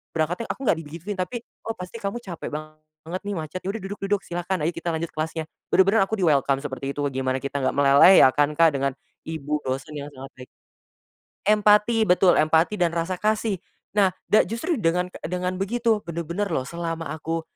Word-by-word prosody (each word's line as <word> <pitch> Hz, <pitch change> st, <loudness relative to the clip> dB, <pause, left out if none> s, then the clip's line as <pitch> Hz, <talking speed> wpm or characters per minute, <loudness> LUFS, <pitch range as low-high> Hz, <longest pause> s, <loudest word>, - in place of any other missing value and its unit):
"berangkatnya." 170 Hz, +8 st, -1 dB
Aku -, -, -8 dB
enggak -, -, +4 dB
digituin, 170 Hz, +7 st, -7 dB
tapi, 225 Hz, +6 st, -3 dB, 0.2 s
"Oh, 225 Hz, -, -2 dB
pasti 180 Hz, +2 st, -8 dB
kamu 200 Hz, +3 st, -3 dB
cape 180 Hz, -7 st, -7 dB
banget 155 Hz, +3 st, -8 dB
nih, 205 Hz, -, -2 dB
macet. 160 Hz, +2 st, -5 dB
Ya 190 Hz, -, -3 dB
udah 225 Hz, -, -5 dB
duduk 195 Hz, +2 st, -6 dB
duduk, 200 Hz, 0 st, +1 dB
silahkan. 175 Hz, +1 st, -3 dB
Ayo, 160 Hz, +3 st, +1 dB
kita 170 Hz, 0 st, -3 dB
lanjut 160 Hz, +1 st, -2 dB
kelasnya." 160 Hz, +1 st, -3 dB, 0.3 s
Benar-benar 195 Hz, +2 st, +5 dB
aku 220 Hz, -, -2 dB
di 185 Hz, -, +2 dB
welcome 140 Hz, -2 st, +3 dB
seperti 135 Hz, -1 st, -4 dB
itu, 145 Hz, -, -3 dB
gimana 130 Hz, 0 st, -1 dB
kita 140 Hz, +1 st, -4 dB
enggak -, -, +1 dB
meleleh, 140 Hz, +6 st, +7 dB
ya 130 Hz, -, +8 dB
kan, 145 Hz, +1 st, +3 dB
Kak, 165 Hz, +2 st, +5 dB
dengan 140 Hz, 0 st, 0 dB, 0.4 s
ibu 150 Hz, -2 st, -2 dB
dosen 135 Hz, +4 st, -4 dB
yang 145 Hz, 0 st, -7 dB
sangat 135 Hz, 0 st, -10 dB
baik 130 Hz, -, -11 dB, 1.0 s
Empati! 210 Hz, +2 st, +4 dB
Betul, 180 Hz, 0 st, +5 dB
empati 160 Hz, +6 st, +3 dB
dan 175 Hz, -2 st, +2 dB
rasa 170 Hz, +2 st, -1 dB
kasih. 215 Hz, -1 st, 0 dB, 0.4 s
Nah, 195 Hz, -3 st, +4 dB, 0.2 s
da 215 Hz, -, +5 dB
justru 235 Hz, -, -2 dB
dengan 180 Hz, -1 st, +1 dB, 0.2 s
dengan 180 Hz, +1 st, -2 dB
begitu, 225 Hz, +2 st, +1 dB
benar-benar 170 Hz, +4 st, -3 dB
loh, 130 Hz, -, 0 dB
selama 165 Hz, -2 st, -4 dB
aku 160 Hz, +2 st, -3 dB
170 Hz, 190 wpm, -24 LUFS, 155-195 Hz, 1.0 s, ya